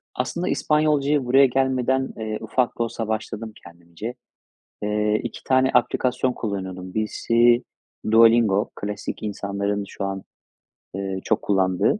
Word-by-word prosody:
Aslında 170 +8 -2
İspanyolcaya 150 -2 +2
buraya 135 +3 +6
gelmeden, 130 0 +1
eee, 110 -1 -3
ufak 120 +3 -1
da 115 - +3
olsa 115 -1 -4
başladım 110 0 -4
kendimce. 85 +7 -8 0.7
Eee, 105 +1 +1
2 - - -7
tane 130 0 +3
aplikasyon 125 +1 +2
kullanıyordum. 95 -5 -5
Birisi 115 +2 +2 0.5
Duolingo. 115 -3 +5
Klasik, 105 +1 -5
insanların 100 0 -2
şu - - -5
an, 95 -1 -4 0.7
eee, 95 -1 -3
çok 110 -1 +1
kullandığı. 95 - +1
110 Hz, 120 wpm, -23 LUFS, 100-125 Hz, 0.7 s, buraya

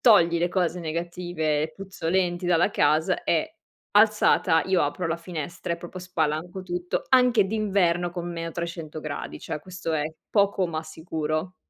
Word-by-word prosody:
"Togli 170 -7 +6
le 175 +1 +1
cose 180 -1 0
negative, 165 -2 -2
puzzolenti 180 -1 -1
dalla 175 +2 +3
casa". 160 +2 +2
E 165 - +1 0.5
alzata 210 -6 +5
io 190 -2 +3
apro 145 +5 -1
la 165 +1 -1
finestra 170 +1 -5
e - - -2
proprio 175 +2 -8
spalanco 175 0 -2
tutto, 175 -1 -3
anche 250 -5 +5
d'inverno 190 -5 +1
con 175 0 -5
meno 165 -1 -4
300 165 -2 -5
gradi, 150 -1 -5
cioè - - -4
questo 180 -1 -5
è 150 -2 +1 0.3
poco 200 -2 +3
ma 160 -2 -3
sicuro. 160 +1 -3
175 Hz, 150 wpm, -26 LUFS, 160-185 Hz, 0.5 s, Togli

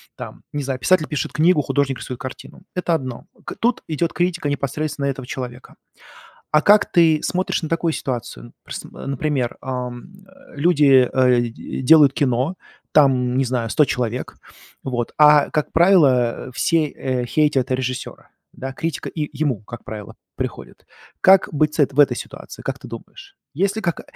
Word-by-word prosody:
Там, - - -9
не 145 -1 -2
знаю, 135 -1 -3
писатель 160 +4 +2
пишет 150 -3 -3
книгу, 160 0 +3
художник 140 -2 -1
свою 125 - -6
картину- 130 +7 -9
это 180 -2 0
одно. 130 -5 -5 0.2
К - - -6
тут 235 +1 0
идет 165 +1 -1
критика 175 -4 -1
непосредственно 145 0 -2
этого 135 -2 -4
человека. 125 -1 -7 0.8
А 150 0 +4
как 205 +3 +5
ты 165 -3 +4
смотришь 185 -1 -1
на 160 - -2
такую 165 0 0
ситуацию? 120 -2 -5
Прс - - -7
например, 135 -2 -3
ам, 125 +4 -6
э, - - -19
люди, 140 -5 +4
э, 125 -2 +4
д 120 -1 -3 0.3
делают 145 -1 +6
кино, 135 +6 0 0.4
там, 130 -4 +3
не 135 - +3
знаю, 120 -2 -2
100 150 +3 +3
человек, 125 -1 -3 0.5
вот, 120 -3 -3
а, 150 -1 +6
как 150 - -1
правило, 140 -10 +3
все, 165 +4 +2
э, 130 -2 -3
хейтят 140 -1 +1
режиссера, 130 0 -4 0.2
да, 135 0 -6
критика 160 +2 -4
и 150 -2 -4
ему, 135 -9 0
как 120 +1 -10
правило, 105 -3 -8 0.2
приходит. - - -6 0.4
Как 190 0 +6
быть 150 +1 +1
с - - -7
эт 140 -2 +3
в 145 - -3
этой 145 - +5
ситуации, - - -9
как - - -4
ты - - -11
думаешь? 395 0 -11 0.2
Есть 195 +7 0
ли, 220 - -3
как 170 -4 -2
140 Hz, 165 wpm, -21 LUFS, 125-160 Hz, 0.8 s, делают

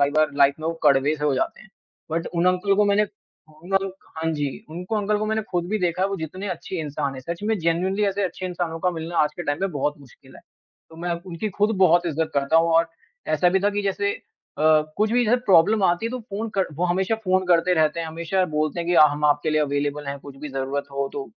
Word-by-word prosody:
कई 140 0 +3
बार 155 -1 +3
लाइफ 140 0 +5
में 160 - -3
वो 165 - 0
कड़वे 145 0 +4
से 150 - -4
हो 145 -2 +2
जाते - - -2
हैं। - - -17 0.4
बट 165 +1 -2
उन 175 +1 0
अंकल 185 +2 +2
को 210 - +4
मैंने 205 +1 +3 0.6
उन 185 +2 -9
अंक 195 -1 -2 0.2
हाँ 160 0 -1
जी, 145 +6 -4
उनको 180 +7 -4
अंकल 210 0 +1
को 215 - -2
मैंने 220 0 0
ख़ुद 175 -1 0
भी 215 +1 0
देखा 180 0 0
है 195 - +2
वो 195 - -3
जितने 185 +5 -6
अच्छे 180 +1 -5
इंसान 145 -2 -3
हैं 130 - -7
सच 170 +8 -6
में 220 0 0
जेनुइनली 185 +5 0
ऐसे 200 0 0
अच्छे 185 +1 -4
इंसानों 175 -2 -3
का 180 - +2
मिलना 165 0 -5
आज 150 0 +3
के 175 - -4
टाइम 145 -2 -1
में 195 - 0
बहुत 145 +1 -1
मुश्किल 135 -4 -18
है। - - -15 0.5
तो 160 - -14
मैं 175 +1 -2
उनकी 185 +4 -4
ख़ुद 210 +1 +2
बहुत 175 -1 +4
इज़्ज़त 160 0 -1
करता 140 +3 +2
हूँ 165 +1 +4
और 165 0 +4 0.5
ऐसा 175 +4 +3
भी 190 +1 +2
था 205 - +2
कि 205 0 -2
जैसे 200 +1 0
अ, 150 - -11 0.3
कुछ 215 +2 +1
भी 245 0 +3
जैसे 235 +3 +3
प्रॉब्लम 200 +3 +5
आती 175 +6 +2
है - - -3
तो 255 - -4
फ़ोन 225 0 -5
कर 190 - +2
वो 175 +4 -1
हमेशा 190 +4 +1
फ़ोन 185 0 +2
करते 175 +1 +3
रहते 155 0 +2
हैं 165 - -3
हमेशा 170 +4 -1
बोलते 155 +2 0
हैं 170 - -4
कि 175 - +2
अ, 155 - +8
हम 145 +1 -3
आपके 145 +1 +2
लिए 155 0 +2
अवेलेबल 145 0 -1
हैं 140 0 -4
कुछ 140 -1 -11
भी 150 - -5
ज़रूरत 135 +1 -2
हो 140 0 -1
तो 140 - -4
170 Hz, 260 wpm, -23 LUFS, 150-195 Hz, 0.6 s, अ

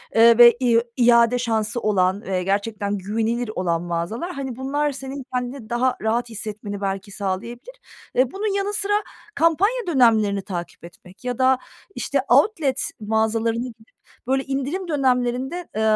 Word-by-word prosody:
eee, 230 +1 +7
ve 240 -1 +8
i 235 -2 +4 0.2
iade 235 0 +5
şansı 225 -1 -1
olan 195 -2 +1
ve 185 -4 -2
gerçekten 200 +1 -1
güvenilir 225 +4 -2
olan 170 -2 0
mağazalar, 175 - -3
hani, 265 -3 -5
bunlar 290 +3 -1
senin 270 0 -7
kendini 250 -2 -4
daha 250 +1 +1
rahat 230 +2 0
hissetmeni 210 -2 -6
belki 195 0 -3
sağlayabilir. 230 - -5 0.4
Eee, 255 0 +3
bunun 400 0 -2
yanı 400 +1 -1
sıra 410 -1 -1 0.4
kampanya 390 +8 +2
dönemlerini 220 - +3
takip 175 -3 -7
etmek 180 +5 -16
ya 250 -1 -2
da, 260 0 +4 0.4
işte, 280 -2 -1
outlet 280 - +2
mağazalarına 225 +2 0
gidip 225 -2 -14 0.4
böyle 265 +1 +1
indirim 275 +8 -3
dönemlerinde, 265 +3 0
eee, 220 - -1
235 Hz, 145 wpm, -22 LUFS, 210-270 Hz, 0.4 s, ve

